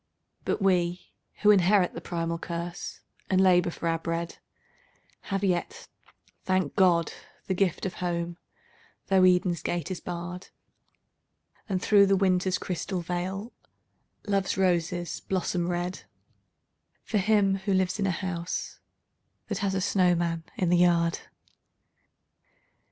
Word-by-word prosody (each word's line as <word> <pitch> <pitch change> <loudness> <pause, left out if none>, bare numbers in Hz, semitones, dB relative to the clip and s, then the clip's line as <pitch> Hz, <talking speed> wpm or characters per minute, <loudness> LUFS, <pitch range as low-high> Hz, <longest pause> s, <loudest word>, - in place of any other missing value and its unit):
But - - -1
we 180 -2 +1 0.3
who 210 - +8
inherit 190 -1 +4
the - - -7
primal 165 -1 -3
curse, 170 +1 -5 0.3
and 185 - +3
labour 180 -2 +4
for 170 - -4
our 165 0 +1
bread, 165 +1 -4 0.9
Have 195 0 -1
yet, 180 -3 -1 0.6
thank 185 0 0
God, 175 -5 +3 0.3
the 190 - -1
gift 185 -1 0
of 185 - -2
Home, 175 -1 -3 0.7
though 190 -1 +5
Eden's 180 -2 +3
gate 175 +2 -2
is 185 - -3
barred: 175 +1 -6 1.2
And 190 -2 0
through 200 -2 +6
the 195 - +4
Winter's 185 -1 +2
crystal 180 0 -3
veil, 185 +6 -4 0.7
Love's 195 -2 0
roses 175 -2 0
blossom 180 -2 -1
red, 175 +1 -3 1.0
For 215 - 0
him 195 -1 +3
who 195 +1 -1
lives 185 +1 0
in 195 - +1
a - - +2
house 175 -1 -4 0.7
that 205 -2 -2
has 195 -2 0
a 190 - 0
snowman 175 -4 +1
in 180 - +1
the 175 - +4
yard. 170 -1 +3
180 Hz, 130 wpm, -27 LUFS, 175-190 Hz, 1.2 s, who